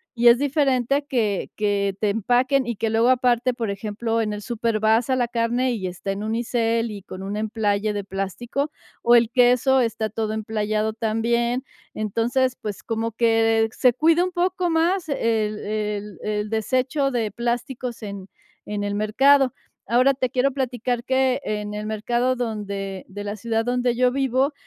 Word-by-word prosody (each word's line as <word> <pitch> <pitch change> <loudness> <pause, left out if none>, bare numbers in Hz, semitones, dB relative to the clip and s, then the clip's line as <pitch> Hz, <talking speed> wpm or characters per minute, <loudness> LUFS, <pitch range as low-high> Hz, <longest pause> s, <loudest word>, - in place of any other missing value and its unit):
y 240 0 +3
es 235 0 +8
diferente 275 -1 +1
que 215 -8 0
que 200 -2 0
te 210 - +2
empaquen 245 +6 +2
y 235 - -2
que 225 +2 -1
luego 225 +2 +3
aparte, 250 -1 +2
por 230 -3 -3
ejemplo, 220 +3 -2
en 210 -1 -1
el 210 - -5
súper 230 -1 -1
vas 220 +3 +3
a 260 - +3
la 245 -2 +1
carne 240 +2 0
y 195 -5 -3
está 185 +2 -4
en 195 +1 -4
unicel 230 0 0
y 200 -2 -8
con 190 -1 -8
un 200 +2 -4
emplaye 210 -1 0
de 205 -1 -3
plástico, 195 +9 -3 0.3
o 240 +1 +5
el 235 -1 +4
queso 250 +1 +4
está 220 -2 -1
todo 215 0 -2
emplayado 215 0 -1
también. 235 +3 0 0.3
Entonces, 240 +4 0
pues, 205 -2 -5
como 225 0 -2
que 225 -1 +3
se 250 +1 +3
cuida 325 +6 +3
un 370 - -4
poco 360 0 0
más 335 +2 +1
el 220 -5 0
el 210 -1 -3
el 210 0 -2
desecho 255 +6 0
de 230 -4 -1
plásticos 240 +2 -3
en 200 -2 -7 0.4
en 205 -1 -3
el 205 0 -2
mercado. 260 +5 +4 0.4
Ahora, 255 +3 +5
te 255 -1 -1
quiero 255 +3 +1
platicar 245 -2 -2
que 260 +1 +1
en 210 -1 -3
el 210 0 -4
mercado 240 +4 0
donde 200 -5 -4
de 205 +1 -7
la 205 0 -4
ciudad 225 +1 -1
donde 245 0 +1
yo 250 +1 +3
vivo, 270 +1 +1
230 Hz, 175 wpm, -23 LUFS, 210-255 Hz, 0.4 s, es